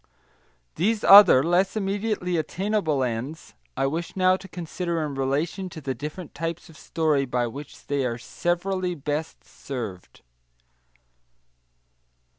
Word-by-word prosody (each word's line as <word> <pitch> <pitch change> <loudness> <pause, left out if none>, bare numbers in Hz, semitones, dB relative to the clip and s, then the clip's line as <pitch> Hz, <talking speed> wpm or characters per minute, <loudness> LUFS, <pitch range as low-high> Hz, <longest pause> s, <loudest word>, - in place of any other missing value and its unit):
These 210 +5 +1
other, 195 -10 +9
less 180 +6 +2
immediately 200 -2 -1
attainable 165 -2 0
ends, 125 +6 -4 0.2
I - - +1
wish 165 +5 -3
now 185 -1 +4
to 190 +1 -9
consider 170 -2 -3
in 145 - -5
relation 145 +8 -1
to 165 - -9
the 135 -3 -3
different 150 +6 -7
types 165 +3 -5
of 160 - -15
story 155 -4 0
by 125 0 0
which 140 +5 -9
they 140 -1 -1
are 120 -2 -2
severally 180 +6 -2
best 150 +1 -4
served. 110 -10 -8
165 Hz, 125 wpm, -25 LUFS, 140-185 Hz, 0.2 s, other